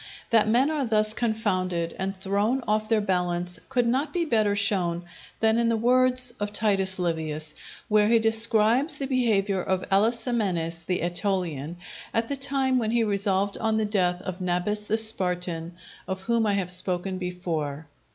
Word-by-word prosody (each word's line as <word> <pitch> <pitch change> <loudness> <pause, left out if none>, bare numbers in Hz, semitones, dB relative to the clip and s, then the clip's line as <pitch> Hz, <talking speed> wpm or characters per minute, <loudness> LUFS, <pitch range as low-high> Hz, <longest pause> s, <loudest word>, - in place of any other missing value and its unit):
That 220 -2 +4
men 255 +7 +3
are 300 -3 -1
thus 215 -2 +2
confounded, 185 -7 -1
and 190 +1 -3
thrown 205 +7 -1
off 215 0 0
their 225 -1 +3
balance, 180 -3 -1
could 250 -2 +1
not 265 +6 0
be 350 -2 -1
better 215 -7 +1
shown 185 -4 +1 0.4
than 220 +1 +3
in 235 0 +2
the 230 - +1
words 250 +1 +3
of 205 0 -3
Titus 195 -3 +1
Livius, 160 -3 -2 0.3
where 210 -1 +3
he 230 +1 +5
describes 225 +5 +3
the 275 - -3
behaviour 210 -7 +1
of 190 0 -2
Alasamenes 200 -6 0
the 180 - -1
Etolian, 175 -4 -2 0.4
at 225 0 0
the 280 - -1
time 270 -1 0
when 220 -2 -1
he 235 0 +2
resolved 200 -1 0
on 220 0 0
the 220 - +1
death 180 -3 0
of 185 -1 -6
Nabis 180 +4 -1
the 210 +1 -1
Spartan, 180 -6 +1 0.3
of 190 0 -4
whom 230 +1 +1
I 205 - +2
have 190 -3 -1
spoken 185 +1 -1
before. 165 -5 -4
205 Hz, 165 wpm, -25 LUFS, 180-225 Hz, 0.4 s, he